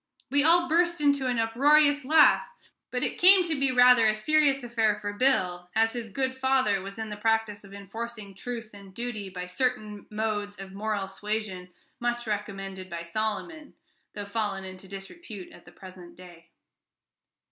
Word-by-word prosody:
We 285 0 +3
all 345 +2 +4
burst 345 +1 +2
into 285 -3 +2
an 250 -1 0
uproarious 290 +6 +4
laugh. 305 +3 +5 0.4
But - - -3
it - - -2
came 370 +1 +7
to 335 -2 -2
be 275 -1 +2
rather 250 -2 +6
a 215 - +2
serious 275 +3 +2
affair 225 -3 0
for 205 -1 -4
Bill, 185 -8 0
as 225 0 +3
his 235 -2 -5
good 260 +4 -2
father 260 -7 +2
was 195 +2 -9
in 220 -1 -5
the 210 - -6
practice 220 -1 0
of 200 - -14
enforcing 205 +1 -8
truth 230 +2 -7
and 200 -2 -14
duty 235 -5 -5
by 180 -1 -6
certain 210 +1 -3
modes 210 -2 -3
of 195 -1 -9
moral 205 0 -2
suasion 195 -2 -5 0.3
much 240 0 -2
recommended 195 -3 -5
by 170 -1 -5
Solomon, 215 - -4 0.4
though 205 -1 -5
fallen 200 -2 -3
into 185 0 -10
disrepute 195 - -10
at - - -16
the - - -15
present 185 -2 -13
day. 175 -2 -15
215 Hz, 170 wpm, -27 LUFS, 195-255 Hz, 0.4 s, came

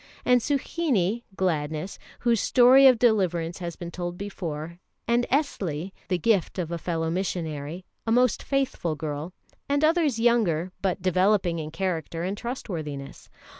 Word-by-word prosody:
And 250 -1 +5
Suhinie 255 - 0
(Gladness), 160 -1 -2 0.2
whose 235 -2 +2
story 260 +2 +7
of 255 -2 +6
deliverance 185 -8 +1
has 170 -2 -5
been 170 -1 -7
told 175 0 -5
before;[E] 170 -4 -5 0.3
and 240 +1 +2
Esli, 195 - -1 0.2
the 180 - +1
gift 200 0 +1
of 170 -3 -3
a 170 - -3
fellow 165 -1 -2
missionary, 170 -2 -3 0.2
a - - +1
most 250 0 +3
faithful 265 - -1
girl; 150 +2 -4 0.4
and 285 +1 +1
others 310 -5 +3
younger, 200 -8 +2
but 190 -2 -1
developing 185 -1 +2
in 155 -1 -5
character 165 -1 -3
and 190 +3 -2
trustworthiness. 160 - -6
185 Hz, 140 wpm, -26 LUFS, 165-235 Hz, 0.4 s, story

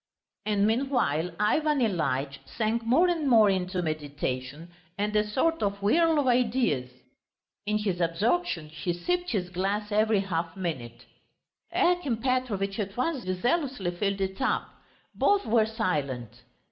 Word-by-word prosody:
And 205 -1 +2
meanwhile 225 - +1
Ivan 300 +8 +2
Ilyitch 145 - 0
sank 230 +1 -1
more 265 +11 +4
and 325 -5 0
more 220 -4 +6
into 185 -1 -1
meditation 145 0 -4 0.3
and 210 +1 -1
a 210 - +4
sort 325 +9 +1
of 200 0 -1
whirl 320 +11 +3
of 290 - +2
ideas; 240 - +1 0.8
in 210 0 +2
his 195 -4 -2
absorption 170 - 0
he 170 +3 -3
sipped 355 - -1
his 180 -5 -2
glass 200 +4 -2
every 215 -1 +3
half 170 -2 -3
minute. 130 -11 -5 0.7
Akim 350 -9 +1
Petrovitch 225 -5 -1
at 200 +1 -4
once 260 - -1
zealously 240 - 0
filled 195 +2 -2
it 190 +4 -3
up. 265 - 0 0.4
Both 405 -5 +2
were 220 -1 +3
silent. 140 - -3
205 Hz, 135 wpm, -27 LUFS, 175-250 Hz, 0.8 s, more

